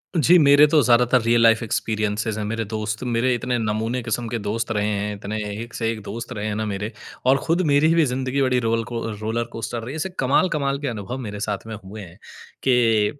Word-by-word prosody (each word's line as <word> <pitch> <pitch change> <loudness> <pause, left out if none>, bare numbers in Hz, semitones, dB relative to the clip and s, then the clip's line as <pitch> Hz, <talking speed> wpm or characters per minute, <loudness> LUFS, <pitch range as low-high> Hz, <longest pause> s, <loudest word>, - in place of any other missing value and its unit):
जी 170 +3 +5
मेरे 145 0 +7
तो 150 0 +4
ज़्यादातर 125 0 +4
रियल 115 +1 +3
लाइफ़ 115 0 +5
एक्सपीरियंसेज़ 110 -1 -1
है। 105 - -2
मेरे 115 +1 -2
दोस्त 110 +1 -4
मेरे 125 +1 +1
इतने 125 +1 -1
नमूने 110 +3 -1
किस्म 115 +1 -2
के 120 - -2
दोस्त 110 +2 -3
रहे 105 -1 0
हैं। 105 0 -2
इतने 100 +2 -5 0.3
एक 120 -1 -12
से 115 - -1
एक 110 -1 -6
दोस्त 115 +4 -7
रहे 105 -2 -4
हैं 105 - -2
ना 110 - -2
मेरे 105 +1 -3 0.4
और 135 +1 +5
खुद 170 +3 +2
मेरी 155 +3 +4
भी 165 - +4
ज़िंदगी 130 +1 -1
बड़ी 130 -2 +2
रोल 115 -1 0
को 115 -1 -3
रोलर 110 +2 -2
कोस्टर 115 +1 -4
रही 125 - -6
है। - - -6
ऐसे 160 +5 -3
कमाल-कमाल 140 0 +1
के 145 - -4
अनुभव 115 +2 -4
मेरे 105 -5 -6
साथ 105 - -3
में 110 - -5
हुए 105 +3 -9
हैं 90 -2 -12 0.5
कि 115 -1 +3
115 Hz, 225 wpm, -22 LUFS, 110-130 Hz, 0.5 s, मेरे